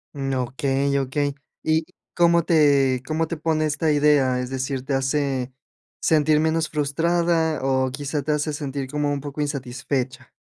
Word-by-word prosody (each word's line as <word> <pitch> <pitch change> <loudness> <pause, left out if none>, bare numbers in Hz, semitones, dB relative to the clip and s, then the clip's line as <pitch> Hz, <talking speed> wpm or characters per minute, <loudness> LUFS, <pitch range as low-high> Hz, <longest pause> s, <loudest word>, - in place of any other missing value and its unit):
Mm, 135 -1 -2 0.2
okey, 140 +1 0
okey, 140 +2 -1 0.3
¿y 160 0 +1 0.3
cómo 170 -1 +4
te 140 -6 +3
cómo 160 +4 -1
te 170 - -3
pone 155 0 0
esta 155 +1 0
idea? 145 -4 +3
Es 125 0 -4
decir, 135 0 -3
¿te 140 - -2
hace 135 -1 0 0.5
sentir 155 -1 +3
menos 160 0 +1
frustrada? 160 +1 +1
O 130 -1 +1
quizá, 145 +2 -3
te 150 +3 -2
hace 150 0 0
sentir 140 -2 -4
como 145 +1 -1
un 140 -1 -2
poco 145 +1 -5
insatisfecha. 130 -2 -3
145 Hz, 155 wpm, -23 LUFS, 135-155 Hz, 0.5 s, cómo